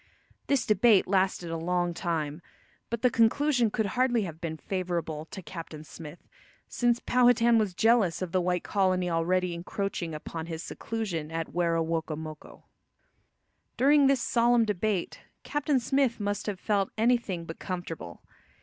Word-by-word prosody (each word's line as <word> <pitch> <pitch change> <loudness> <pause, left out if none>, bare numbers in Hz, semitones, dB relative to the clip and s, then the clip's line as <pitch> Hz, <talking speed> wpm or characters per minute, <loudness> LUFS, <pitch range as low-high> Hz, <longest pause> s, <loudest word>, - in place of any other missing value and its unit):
This 280 -3 +2
debate 215 0 +4
lasted 185 -3 +1
a 165 - -2
long 175 +1 0
time, 160 -2 -3 0.5
but 235 0 -4
the 250 - +4
conclusion 245 +1 +3
could 220 +1 -1
hardly 240 +2 +1
have 165 -3 -7
been 160 -2 -4
favourable 170 -4 -3
to 190 +3 -9
Captain 165 -2 -8
Smith, 155 +1 -11 0.4
since 240 -1 +1
Powhatan 240 -2 +4
was 200 -5 -1
jealous 225 -6 +3
of 185 -3 -4
the 185 - +2
white 180 0 0
colony 185 -3 +1
already 175 +2 +1
encroaching 170 -1 -4
upon 160 +1 -6
his 165 0 -5
seclusion 195 -9 -4
at 165 0 -4
Werowocomoco. 160 -2 -2 1.1
During 285 +1 +5
this 270 -3 +2
solemn 235 -1 +3
debate 210 -2 -1 0.2
Captain 295 -2 0
Smith 265 -1 +1
must 205 0 -2
have 200 -3 -3
felt 200 -2 0
anything 220 -7 +1
but 165 - -8
comfortable. 175 - -6
185 Hz, 140 wpm, -28 LUFS, 165-230 Hz, 1.1 s, During